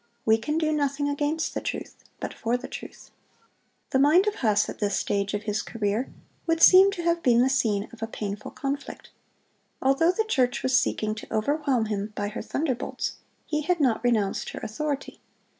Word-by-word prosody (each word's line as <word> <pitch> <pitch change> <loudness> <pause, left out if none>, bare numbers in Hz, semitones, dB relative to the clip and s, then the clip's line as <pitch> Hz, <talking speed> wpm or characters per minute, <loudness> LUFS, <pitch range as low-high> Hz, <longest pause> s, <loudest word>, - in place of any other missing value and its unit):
"We 220 0 +4
can 300 +8 -2
do 310 -1 +1
nothing 285 -1 0
against 290 +2 -1
the - - -3
truth, - - -5 0.2
but - - -4
for 235 +2 -1
the - - -8
truth."(129) - - -10 0.8
"The 265 - +3
mind 310 +8 +5
of 420 - +1
Huss, 210 - +2
at - - -7
this 205 -2 0
stage 200 0 -1
of 205 - -3
his 210 -1 -1
career, 220 +2 -2 0.4
would 330 0 +2
seem 380 +3 +8
to 350 -3 -5
have 340 0 +1
been 245 -3 +4
the 265 - +2
scene 215 -6 +1
of 230 - -13
a 225 - -2
painful 210 -2 -5
conflict. 280 +1 -5 0.7
Although 275 +6 +3
the 440 +4 -1
church 255 - +1
was 260 0 +2
seeking 215 -4 +1
to 215 - -10
overwhelm 265 +1 +1
him 210 0 -3
by 205 0 -2
her 215 - -5
thunderbolts, 275 -5 -3 0.3
he 305 -2 -1
had 350 +3 0
not 255 -6 +2
renounced 220 -5 +1
her - - -6
authority. 280 +5 -4
260 Hz, 190 wpm, -26 LUFS, 215-300 Hz, 0.8 s, seem